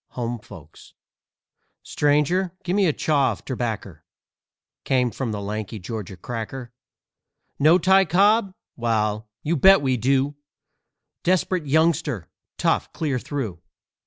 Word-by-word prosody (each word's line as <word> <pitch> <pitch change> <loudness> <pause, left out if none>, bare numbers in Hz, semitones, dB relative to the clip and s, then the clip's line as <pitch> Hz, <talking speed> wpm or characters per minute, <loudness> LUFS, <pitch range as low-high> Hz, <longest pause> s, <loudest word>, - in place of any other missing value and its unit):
"HOME 120 -1 -3
FOLKS" 80 -6 -15 0.9
"Stranger, 150 +5 +1
give 180 +1 -1
me 200 -2 +3
a - - +3
chaw 145 -2 +1
of - - -14
terbaccer," 120 -5 -4 0.8
Came 125 -2 +1
from 125 -2 -3
the 105 - -3
lanky 105 +1 -5
Georgia 105 -1 -6
"cracker." 120 +4 -6 0.9
"Know 155 +5 +6
Ty 190 +2 +4
Cobb? 200 +5 +3 0.2
Wal, 110 -2 -1
you 165 +3 0
bet 190 +2 +6
we 130 -2 +1
do! 135 +4 +1 0.9
Desperate 180 -2 +1
youngster, 155 - +1 0.3
tough - - 0
clear 145 -5 -1
through! 115 - -5
135 Hz, 120 wpm, -23 LUFS, 110-165 Hz, 0.9 s, Know